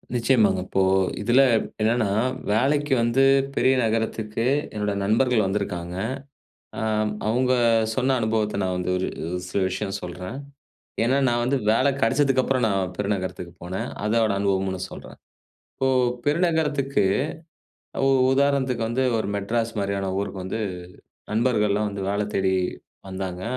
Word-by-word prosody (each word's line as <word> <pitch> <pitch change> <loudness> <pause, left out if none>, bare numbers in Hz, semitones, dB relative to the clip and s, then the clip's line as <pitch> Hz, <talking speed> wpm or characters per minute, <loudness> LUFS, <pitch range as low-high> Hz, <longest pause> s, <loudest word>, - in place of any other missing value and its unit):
நிச்சயமாங்க. 115 -6 +3
இப்போ 95 - 0 0.4
இதுல 120 +5 +4 0.4
என்னன்னா, 110 -1 +2 0.4
வேலைக்கு 140 +5 +2
வந்து 120 +3 +2 0.3
பெரிய 130 - +3
நகரத்துக்கு 110 0 -1 0.3
என்னோட 105 -1 -1
நண்பர்கள் 110 +1 +2
வந்துருக்காங்க. 90 -3 -3 0.8
அ - - -3 0.5
அவங்க 125 +3 +2 0.4
சொன்ன 130 +1 +1
அனுபவத்த 110 -2 0
நான் 95 -1 -1
வந்து 90 0 -2
ஒரு 95 - -1 0.2
ஒரு 90 +1 -3
சில 95 - -1
விஷயம் 95 +1 -3
சொல்றேன். 90 +6 -6 0.7
ஏனா, 130 +4 +2
நான் 120 0 +1
வந்து 135 +3 +1
வேல 130 +5 +3
கிடச்சதுக்கு 135 +2 +3
அப்புறம் 130 -2 +1
நான் 95 -3 -1
பெருநகரத்துக்கு 95 -4 -3
போனே. 90 +2 -4 0.2
அதோட 110 0 +2
அனுபவம்மு 95 -1 0
நான் 90 - -5
சொல்றேன். - - -10 0.6
இப்போ 135 - 0 0.4
பெருநகரத்துக்கு 150 -3 +1 1.0
உ - - +4 0.2
உதாரணத்துக்கு 135 -4 +1
வந்து 120 +3 0 0.2
ஒரு 110 - -2
மெட்ராஸ் 115 +3 -1
மாரியான 100 -1 -1
ஊருக்கு 100 -1 -5
வந்து 95 +4 -3 0.7
நண்பர்கள்லாம் 105 -2 +1
வந்து 100 -1 -5
வேல 100 +1 0
தேடி 95 -1 +1 0.6
வந்தாங்க. 95 -1 -5
110 Hz, 125 wpm, -24 LUFS, 95-125 Hz, 1.0 s, இதுல